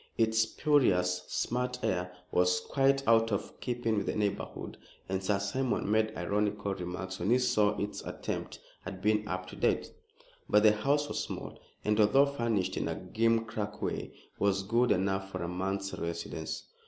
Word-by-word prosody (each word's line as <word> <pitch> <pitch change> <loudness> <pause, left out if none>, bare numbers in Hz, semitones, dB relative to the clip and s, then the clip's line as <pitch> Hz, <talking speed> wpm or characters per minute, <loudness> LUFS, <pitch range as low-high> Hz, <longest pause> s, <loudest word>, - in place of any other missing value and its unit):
Its 110 -1 +3
spurious, 100 -8 +2
smart 125 +1 -1
air 90 0 0 0.2
was 90 0 +3
quite 135 +6 +1
out 115 0 +5
of 100 0 -3
keeping 120 -3 -1
with 100 - -1
the - - -1
neighborhood, 105 -2 -2 0.3
and 95 0 -2
Sir 100 +1 +2
Simon 105 +2 -1
made 110 0 +3
ironical 100 +2 0
remarks 95 0 -5
when 90 - -1
he 125 - +6
saw 105 -5 +2
its 105 0 -3
attempt - - -5 0.2
at 95 -1 -7
being 105 0 +2
up 90 0 -3
to 90 - -10
date. - - 0 0.6
But 105 0 +5
the 110 - +8
house 140 +8 +1
was - - -2
small, - - -7 0.3
and, 105 +1 +2
although 110 +7 +6
furnished 115 -9 -1
in - - -1
a - - -2
gimcrack 110 -2 -1
way, - - -3 0.3
was 100 -1 +2
good 120 +5 +2
enough 95 +1 0
for - - -4
a - - -2
month's 95 +2 -2
residence. 85 0 -4
105 Hz, 165 wpm, -31 LUFS, 95-115 Hz, 0.6 s, the